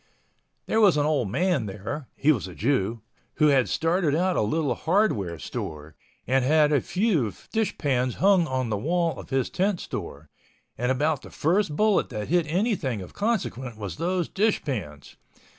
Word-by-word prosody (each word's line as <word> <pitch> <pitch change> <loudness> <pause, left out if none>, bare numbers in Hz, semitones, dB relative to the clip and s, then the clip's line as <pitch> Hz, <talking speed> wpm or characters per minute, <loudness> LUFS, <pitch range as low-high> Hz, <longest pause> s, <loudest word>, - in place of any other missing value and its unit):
There 220 - +1
was 195 -7 +5
an 145 - +2
old 145 -9 +1
man 155 - 0
there—(he 125 +9 -2
was 110 -10 -1
a 90 - -10
Jew)—who 115 - -1
had 135 -3 +3
started 165 -2 +1
a 180 +2 +1
little 140 +5 0
hardware 120 - 0
store, 75 +1 -6 0.3
and 130 +1 +2
had 150 +2 +4
a 145 - +3
few 180 - 0 0.2
dish 220 -2 -1
pans 130 -4 0
hung 190 -3 +4
on 130 -4 -2
the 105 - 0
wall 165 - 0
of - - -10
his 135 -2 0
tent 190 0 0
store, 70 +1 -7 0.4
and 125 +2 0
about 145 +2 0
the - - -12
first 175 0 0
bullet 215 +2 +2
that 105 -1 -5
hit 170 -1 +2
anything 170 - 0
of 90 - -12
consequence 155 - -2
was 100 -6 -6
those 180 0 -1
dish 215 +2 +1
pans. 85 - -5
145 Hz, 165 wpm, -25 LUFS, 115-180 Hz, 0.4 s, was